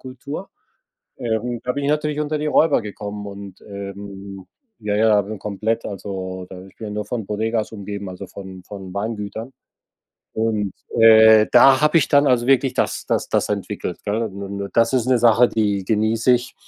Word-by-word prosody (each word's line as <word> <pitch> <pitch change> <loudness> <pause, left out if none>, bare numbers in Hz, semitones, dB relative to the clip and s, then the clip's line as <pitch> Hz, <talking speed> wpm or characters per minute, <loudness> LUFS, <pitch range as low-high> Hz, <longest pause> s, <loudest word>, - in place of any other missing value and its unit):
Kultur, 140 +8 -8 0.7
ähm, 120 0 -2
da 125 - 0
bin 140 0 -3
ich 145 - 0
natürlich 150 0 -1
unter 150 0 -1
die 150 - -2
Räuber 155 -3 +3
gekommen 105 -1 -7
und, 100 -1 -10
ähm, 100 -1 -9 0.3
ja, 105 -1 -2
ja, 105 -1 +4
bin 105 +2 -7
komplett 110 +2 -2
also, 95 -2 -6
da 95 0 -10
ich 95 - -20
bin 110 - -7
ja 105 - -6
nur 105 -1 -3
von 110 -1 -4
Bodegas 110 +2 -2
umgeben, 100 -1 -6
also, 90 - -8
von 95 -2 -10
von 95 -1 -9
Weingütern. 110 +3 -5 0.8
Und, 110 -3 -1 0.3
äh, 110 -1 +7
da 135 -1 +7
habe 150 +2 +5
ich 145 - 0
dann 145 0 +4
also 125 -3 +2
wirklich 135 0 +3
das - - -1
das - - -1
das - - 0
entwickelt, 90 - -4
gell? 105 +2 -1
Und 100 -3 -5
und 100 0 -5
das 115 +1 +4
ist 125 -2 +1
'ne 130 -1 +3
Sache, 120 +1 +5
die 105 -3 0
genieße 110 +4 +2
ich. 125 0 -1
110 Hz, 185 wpm, -21 LUFS, 100-120 Hz, 0.8 s, äh